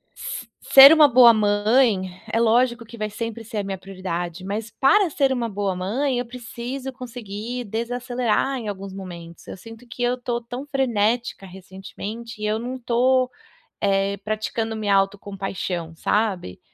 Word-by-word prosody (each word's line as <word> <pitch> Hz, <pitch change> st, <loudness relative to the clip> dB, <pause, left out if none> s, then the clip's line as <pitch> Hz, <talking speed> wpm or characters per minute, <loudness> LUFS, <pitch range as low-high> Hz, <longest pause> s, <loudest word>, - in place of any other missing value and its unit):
Se -, -, -6 dB, 0.2 s
ser 275 Hz, +3 st, +11 dB
uma 310 Hz, -2 st, +7 dB
boa 240 Hz, -2 st, +7 dB
mãe, 210 Hz, -1 st, +2 dB, 0.2 s
é 230 Hz, -, +1 dB
lógico 235 Hz, +1 st, +2 dB
que 235 Hz, +1 st, -12 dB
vai 215 Hz, -1 st, -3 dB
sempre 230 Hz, +1 st, -5 dB
ser 220 Hz, 0 st, -7 dB
a 205 Hz, -, 0 dB
minha 195 Hz, -1 st, -4 dB
prioridade, 185 Hz, -2 st, -5 dB
mas 210 Hz, +3 st, -4 dB
para 370 Hz, -, +3 dB
ser 275 Hz, -3 st, +1 dB
uma 235 Hz, -3 st, -2 dB
boa 200 Hz, -2 st, -2 dB
mãe, 245 Hz, +9 st, -1 dB
eu 245 Hz, -, -3 dB
preciso 250 Hz, +2 st, -6 dB
conseguir 245 Hz, -1 st, -6 dB
desacelerar 245 Hz, +3 st, -1 dB
em 225 Hz, -4 st, -5 dB
alguns 195 Hz, -1 st, -7 dB
momentos. 170 Hz, -3 st, -10 dB
Eu -, -, -8 dB
sinto 225 Hz, +4 st, -13 dB
que 245 Hz, -, -9 dB
eu 245 Hz, 0 st, +2 dB
estou 240 Hz, -1 st, -3 dB
tão 245 Hz, +3 st, -7 dB
frenética 240 Hz, -6 st, 0 dB
recentemente, 195 Hz, +4 st, -9 dB
e -, -, -2 dB
eu 210 Hz, +1 st, 0 dB
não 255 Hz, +2 st, -5 dB
tô, 250 Hz, +2 st, +2 dB, 0.5 s
eh, 195 Hz, 0 st, +1 dB
praticando 215 Hz, +2 st, -3 dB
minha 210 Hz, -2 st, 0 dB
auto 195 Hz, +1 st, +2 dB
compaixão, 185 Hz, -4 st, -5 dB
sabe? 190 Hz, -, -1 dB
225 Hz, 160 wpm, -23 LUFS, 195-245 Hz, 0.5 s, ser